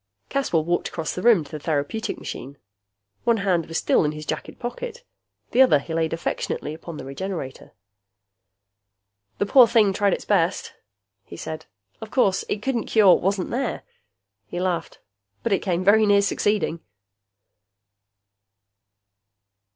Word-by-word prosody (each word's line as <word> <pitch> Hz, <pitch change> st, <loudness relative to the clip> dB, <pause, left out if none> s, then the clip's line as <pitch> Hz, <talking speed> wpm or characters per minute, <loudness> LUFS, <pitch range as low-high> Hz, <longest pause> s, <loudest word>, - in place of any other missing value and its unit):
Caswell 220 Hz, -, 0 dB
walked 175 Hz, +1 st, 0 dB
across 160 Hz, -3 st, -4 dB
the 180 Hz, -, -5 dB
room 225 Hz, -7 st, +5 dB
to 145 Hz, -, -15 dB
the 155 Hz, -, -5 dB
therapeutic 150 Hz, +8 st, -2 dB
machine. 140 Hz, +2 st, -8 dB, 0.7 s
One 235 Hz, -1 st, +3 dB
hand 185 Hz, -5 st, 0 dB
was 165 Hz, -, -3 dB
still -, -, +3 dB
in 150 Hz, 0 st, 0 dB
his 155 Hz, 0 st, -8 dB
jacket -, -, -5 dB
pocket; 465 Hz, -, -6 dB, 0.5 s
the 255 Hz, -, +4 dB
other 255 Hz, -, +6 dB
he 155 Hz, +4 st, -6 dB
laid 160 Hz, -1 st, 0 dB
affectionately 165 Hz, -2 st, -3 dB
upon 165 Hz, 0 st, -9 dB
the -, -, -7 dB
Regenerator. 140 Hz, -1 st, -6 dB, 1.6 s
"The -, -, 0 dB
poor 245 Hz, +3 st, +7 dB
thing 210 Hz, -3 st, +4 dB
tried 200 Hz, -1 st, +2 dB
its -, -, -4 dB
best," -, -, +1 dB, 0.5 s
he 85 Hz, -, -11 dB
said. 155 Hz, -, -7 dB, 0.3 s
"Of 220 Hz, -, -7 dB
course, 200 Hz, -6 st, +2 dB
it 210 Hz, -, -2 dB
couldn't 255 Hz, -4 st, -1 dB
cure 215 Hz, -4 st, +5 dB
what -, -, +1 dB
wasn't 195 Hz, 0 st, -1 dB
there." 250 Hz, 0 st, -2 dB, 0.6 s
He 175 Hz, -, -5 dB
laughed. 180 Hz, -2 st, -2 dB, 0.5 s
"But 230 Hz, -, +1 dB
it 195 Hz, -, +2 dB
came 180 Hz, -1 st, -1 dB
very 215 Hz, +2 st, +5 dB
near 200 Hz, 0 st, +5 dB
succeeding!" 200 Hz, -4 st, 0 dB
190 Hz, 150 wpm, -23 LUFS, 160-220 Hz, 1.6 s, poor